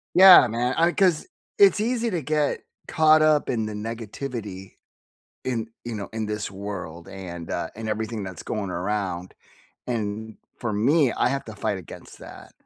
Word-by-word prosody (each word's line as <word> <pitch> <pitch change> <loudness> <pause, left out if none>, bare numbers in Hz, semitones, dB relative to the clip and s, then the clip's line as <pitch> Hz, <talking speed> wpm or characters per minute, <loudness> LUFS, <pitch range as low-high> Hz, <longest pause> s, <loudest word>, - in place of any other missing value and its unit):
Yeah, 185 -6 +10
man. 120 +3 -1
I 170 +1 +3
'cause 180 -6 +2 0.3
it's 400 - +6
easy 235 +1 0
to 175 -5 -2
get 150 +1 0 0.3
caught 155 -2 +5
up 155 -1 +3
in 110 -3 -1
the 110 - -5
negativity 110 -2 -6 0.7
in, 115 -3 -2 0.2
you 120 - -5
know, 100 -2 -5
in 110 -1 -3
this 105 -1 -3
world 95 -4 -7
and, 85 -3 -8
uh, - - -3
and 110 0 -6
everything 110 0 -3
that's 95 -3 -7
going 100 -4 -3
around. 90 -1 -3 0.5
And 110 -2 -3 0.2
for 120 -3 -3
me, 130 +5 +3
I - - +1
have 135 +1 -2
to 110 - -8
fight 100 -1 -2
against 90 - -12
that. - - -12
110 Hz, 165 wpm, -24 LUFS, 100-145 Hz, 0.7 s, Yeah